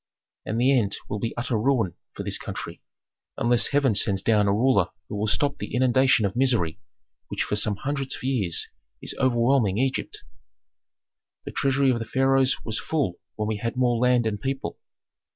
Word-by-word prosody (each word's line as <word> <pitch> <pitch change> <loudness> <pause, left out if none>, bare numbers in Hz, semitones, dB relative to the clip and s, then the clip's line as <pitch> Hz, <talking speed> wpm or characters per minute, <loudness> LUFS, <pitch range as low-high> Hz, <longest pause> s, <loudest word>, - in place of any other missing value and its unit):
And 110 - -1
the 135 +3 +4
end 105 -6 +1
will 105 - -4
be 115 +3 -4
utter 120 -2 -1
ruin 115 -7 +1 0.2
for - - -6
this - - -1
country, - - -7 0.6
unless 120 -2 +3
heaven 140 -4 +2
sends 95 -1 +2
down 105 -2 +3
a - - +3
ruler 105 -3 +3 0.2
who - - -6
will 105 +1 -1
stop 140 +6 0
the - - -5
inundation 130 -2 +3
of 100 - -2
misery 120 -11 +1 0.5
which - - -2
for - - -2
some 105 0 +2
hundreds 135 +4 -3
of - - -11
years 115 -11 0 0.4
is - - -3
overwhelming 120 -4 +2
Egypt. 135 +2 -2 1.2
"The - - -6
treasury 135 -1 +2
of 120 - -1
the 115 - -4
pharaohs 135 +2 +1
was 110 -1 -2
full 140 - -2 0.2
when 105 0 -2
we 110 -1 -1
had 115 +2 -3
more 120 -2 +2
land 125 -1 +3
and 105 -2 -2
people. 135 0 -4
120 Hz, 180 wpm, -25 LUFS, 105-135 Hz, 1.2 s, the